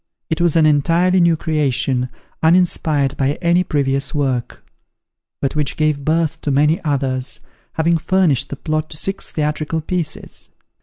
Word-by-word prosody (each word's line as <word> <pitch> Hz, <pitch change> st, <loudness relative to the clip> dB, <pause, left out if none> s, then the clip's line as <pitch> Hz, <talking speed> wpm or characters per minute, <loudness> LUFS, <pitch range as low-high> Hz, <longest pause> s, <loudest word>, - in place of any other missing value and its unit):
It 160 Hz, -, 0 dB
was 170 Hz, -2 st, +2 dB
an 160 Hz, -2 st, +5 dB
entirely 170 Hz, +5 st, +3 dB
new 170 Hz, -1 st, +4 dB
creation, 135 Hz, -5 st, 0 dB, 0.3 s
uninspired 160 Hz, -4 st, +2 dB
by 135 Hz, +1 st, +1 dB
any 175 Hz, +1 st, +3 dB
previous 140 Hz, -4 st, -1 dB
work; 130 Hz, -4 st, -2 dB, 0.8 s
but 135 Hz, -, 0 dB
which 150 Hz, -2 st, -1 dB
gave 155 Hz, -2 st, +1 dB
birth 160 Hz, +1 st, 0 dB
to -, -, -2 dB
many 150 Hz, +4 st, +2 dB
others, 135 Hz, -3 st, -1 dB, 0.3 s
having 165 Hz, +1 st, +1 dB
furnished 170 Hz, -6 st, +1 dB
the -, -, -4 dB
plot 155 Hz, +2 st, -2 dB
to 150 Hz, -, -7 dB
six 195 Hz, +5 st, -3 dB
theatrical 155 Hz, +1 st, -2 dB
pieces. 160 Hz, -1 st, -3 dB
155 Hz, 145 wpm, -19 LUFS, 140-165 Hz, 0.8 s, an